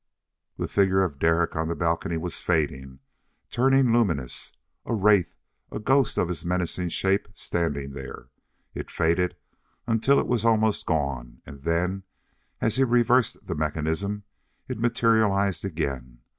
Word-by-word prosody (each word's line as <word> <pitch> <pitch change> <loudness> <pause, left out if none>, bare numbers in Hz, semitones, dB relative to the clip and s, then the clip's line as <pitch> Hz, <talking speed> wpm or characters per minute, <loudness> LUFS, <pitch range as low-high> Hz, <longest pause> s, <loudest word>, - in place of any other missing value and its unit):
The - - -2
figure 95 -1 +3
of 75 -7 -3
Derek 80 +1 +2
on 80 0 -1
the 85 - -2
balcony 85 -1 -1
was 85 +2 -3
fading, 65 -6 -2 0.5
turning 130 -1 +3
luminous. 80 - 0 0.3
A 115 - -2
wraith, 100 -3 +3 0.3
a - - -4
ghost 130 +3 +2
of - - +2
his 90 -2 -3
menacing 90 0 -1
shape 95 +4 +1
standing 70 -5 -2
there. 70 -1 -9 0.4
It - - -6
faded 85 +2 +1 0.5
until 115 +5 +3
it - - 0
was 120 -3 0
almost 110 -2 +2
gone, 70 -6 -2
and 70 0 -11
then, 90 +5 0 0.6
as 115 - +1
he 135 - +4
reversed 120 -1 +2
the 85 - -3
mechanism, 80 +6 -2 0.4
it - - -5
materialized 110 -6 +2
again. 70 -9 -4
90 Hz, 140 wpm, -25 LUFS, 80-110 Hz, 0.6 s, he